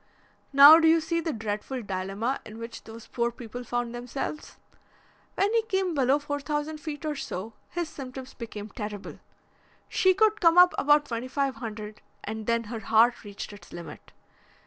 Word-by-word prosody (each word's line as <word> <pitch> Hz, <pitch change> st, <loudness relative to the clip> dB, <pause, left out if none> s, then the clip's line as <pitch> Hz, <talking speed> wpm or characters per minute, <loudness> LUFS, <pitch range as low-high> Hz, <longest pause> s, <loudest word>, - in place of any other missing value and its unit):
Now, 285 Hz, +3 st, +10 dB
do 325 Hz, -, +4 dB
you 325 Hz, +1 st, +6 dB
see 335 Hz, +1 st, -1 dB
the 325 Hz, -, -2 dB
dreadful 220 Hz, +2 st, -4 dB
dilemma 195 Hz, +6 st, -2 dB
in 220 Hz, 0 st, -10 dB
which 230 Hz, +1 st, -8 dB
those 225 Hz, 0 st, -10 dB
poor 235 Hz, -1 st, -1 dB
people 240 Hz, +1 st, -8 dB
found 240 Hz, 0 st, -3 dB
themselves? 250 Hz, +5 st, -5 dB, 0.8 s
When 405 Hz, +3 st, +1 dB
he 460 Hz, -, +4 dB
came 385 Hz, -5 st, -1 dB
below 270 Hz, -1 st, +3 dB
four 290 Hz, 0 st, -4 dB
thousand 295 Hz, +1 st, -3 dB
feet 300 Hz, 0 st, -6 dB
or 305 Hz, -, -1 dB
so, 220 Hz, -5 st, -5 dB, 0.2 s
his 345 Hz, -1 st, -3 dB
symptoms 265 Hz, -3 st, -8 dB
became 220 Hz, -3 st, -7 dB
terrible. 210 Hz, -1 st, -7 dB, 0.7 s
She 375 Hz, -1 st, +3 dB
could 430 Hz, +1 st, +3 dB
come 335 Hz, -1 st, +5 dB
up 360 Hz, 0 st, +8 dB
about 295 Hz, +1 st, +4 dB
twenty 235 Hz, +1 st, -4 dB
five 275 Hz, -1 st, -1 dB
hundred 215 Hz, -2 st, -7 dB, 0.2 s
and 220 Hz, 0 st, -5 dB
then 230 Hz, 0 st, +1 dB
her 225 Hz, +1 st, -6 dB
heart 225 Hz, +4 st, +3 dB
reached 205 Hz, 0 st, -8 dB
its 195 Hz, -4 st, -14 dB
limit. 170 Hz, -3 st, -10 dB
250 Hz, 170 wpm, -27 LUFS, 220-305 Hz, 0.8 s, Now